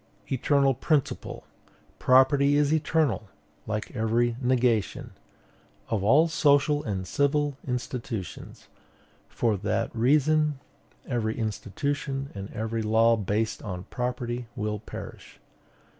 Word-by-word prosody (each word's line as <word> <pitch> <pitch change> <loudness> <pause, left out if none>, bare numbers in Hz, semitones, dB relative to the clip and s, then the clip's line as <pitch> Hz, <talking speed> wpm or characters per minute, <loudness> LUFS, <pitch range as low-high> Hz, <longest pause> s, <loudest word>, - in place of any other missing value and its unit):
"Eternal 140 +1 +3
principle, 145 +3 -1 0.3
" - - -33
Property 140 +2 +5
is 145 +1 +3
eternal, 155 -8 +1 0.4
like 105 -1 -4
every 115 +2 +1
negation, 125 -4 +1 0.8
"Of 110 -4 -1
all 140 +10 +5
social 145 -2 +3
and 95 -4 -3
civil 145 - +1
institutions." 120 -5 -5 0.6
For 110 -3 0
that 110 +4 -2
reason, 150 +4 +3 0.5
every 110 -2 -1
institution 135 +5 -3
and 100 0 -7
every 110 +1 -3
law 110 +2 +4
based 110 +1 -1
on 90 -4 -5
property 125 -1 -3
will 105 -2 -2
perish. 110 - -10
125 Hz, 105 wpm, -27 LUFS, 110-140 Hz, 0.8 s, Property